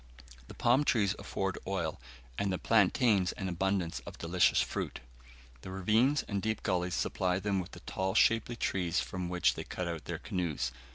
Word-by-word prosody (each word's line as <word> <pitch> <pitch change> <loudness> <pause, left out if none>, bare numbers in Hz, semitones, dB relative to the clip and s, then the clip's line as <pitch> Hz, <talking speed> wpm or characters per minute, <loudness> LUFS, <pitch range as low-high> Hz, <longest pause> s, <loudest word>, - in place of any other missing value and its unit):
The - - -11
palm 125 +5 +3
trees 105 -9 +2
afford 95 -1 -3
oil, 85 -8 -2 0.3
and 100 +6 -1
the 95 - 0
plantains 105 -2 +3
an 95 - -4
abundance 90 -1 -1
of - - -8
delicious 90 +2 +3
fruit. - - -2 0.6
The - - -8
ravines 110 +10 +2
and 100 -2 -2
deep 110 0 -2
gullies 90 -2 0
supply 90 -1 0
them 100 0 0
with 90 - -6
the - - -10
tall 95 +1 -2
shapely 115 +1 +3
trees 90 -6 0
from 90 -2 -3
which 90 0 +2
they - - -5
cut 90 - -4
out 85 -2 -4
their - - -3
canoes. 80 -9 -2
95 Hz, 175 wpm, -32 LUFS, 90-105 Hz, 0.6 s, palm